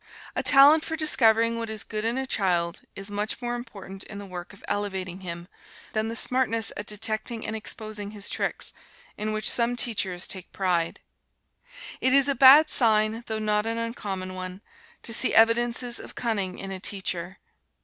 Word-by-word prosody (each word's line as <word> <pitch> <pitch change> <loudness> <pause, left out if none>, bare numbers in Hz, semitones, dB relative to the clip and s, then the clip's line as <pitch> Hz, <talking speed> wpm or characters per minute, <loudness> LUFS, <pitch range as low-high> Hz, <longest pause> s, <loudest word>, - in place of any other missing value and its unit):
A - - 0
talent 290 +3 +6
for 320 - -4
discovering 230 -7 +3
what 230 -1 -4
is 220 -1 -3
good 215 -1 -5
in 235 +3 0
a 265 - -2
child 175 -7 0
is 195 +1 -5
much 205 +1 -2
more 240 -1 -3
important 195 -5 -8
in 210 - -9
the 200 - -8
work 180 -2 -8
of 200 - -17
elevating 190 -3 -3
him, 170 -2 -7 0.5
than 220 0 -1
the 225 - -5
smartness 230 -3 +1
at 205 - -6
detecting 220 +2 -2
and 220 - -3
exposing 215 -1 -3
his 205 -1 -6
tricks, - - -1 0.4
in 215 +1 -3
which 215 0 -3
some 240 0 +3
teachers 195 -7 0
take 185 -2 -4
pride. 175 -3 -1 1.0
It 260 +1 +3
is 275 0 +5
a 280 - +2
bad 275 +4 +8
sign, 220 -1 +3
though 220 - -2
not 210 0 0
an 230 0 -2
uncommon 200 -5 -4
one, 185 +2 -7 0.4
to 230 - -1
see 255 - +3
evidences 240 +2 +3
of - - -11
cunning 205 -6 -2
in 195 - -7
a 190 - -5
teacher. 185 -2 -3
215 Hz, 180 wpm, -25 LUFS, 195-235 Hz, 1.0 s, bad